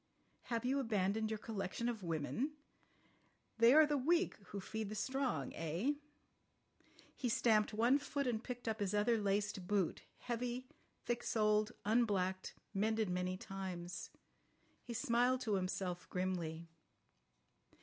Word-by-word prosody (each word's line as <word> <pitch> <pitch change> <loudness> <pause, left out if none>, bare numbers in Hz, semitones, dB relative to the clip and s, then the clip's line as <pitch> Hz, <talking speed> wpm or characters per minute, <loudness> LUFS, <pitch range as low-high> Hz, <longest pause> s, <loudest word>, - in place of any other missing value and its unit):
Have 235 0 -2
you 270 +2 +2
abandoned 215 -2 +1
your 220 - -1
collection 210 +1 -3
of 235 -3 -2
women? 175 - -1 1.1
They 230 +1 +8
are 310 +3 +8
the 295 -1 +1
weak 340 +7 +3
who 200 - -5
feed 215 +2 -4
the 215 - -5
strong—eh?" 245 - -1 1.2
He 250 - -1
stamped 215 -2 +3
one 235 +6 +4
foot, 285 0 -2
and 235 -2 -1
picked 245 -1 -6
up 220 0 -1
his 205 0 0
other 220 +2 +3
laced 205 -2 0
boot, 195 -4 +1 0.2
heavy, 245 +1 -3 0.4
thick 240 0 0
soled, 215 -1 +2
unblacked, 200 -4 +1 0.2
mended 220 0 +1
many 180 +1 -1
times. 185 -2 -5 0.7
He 235 - -6
smiled 250 0 +2
to 220 -4 0
himself 185 -1 -2
grimly. 170 -3 -2
215 Hz, 130 wpm, -37 LUFS, 190-245 Hz, 1.2 s, They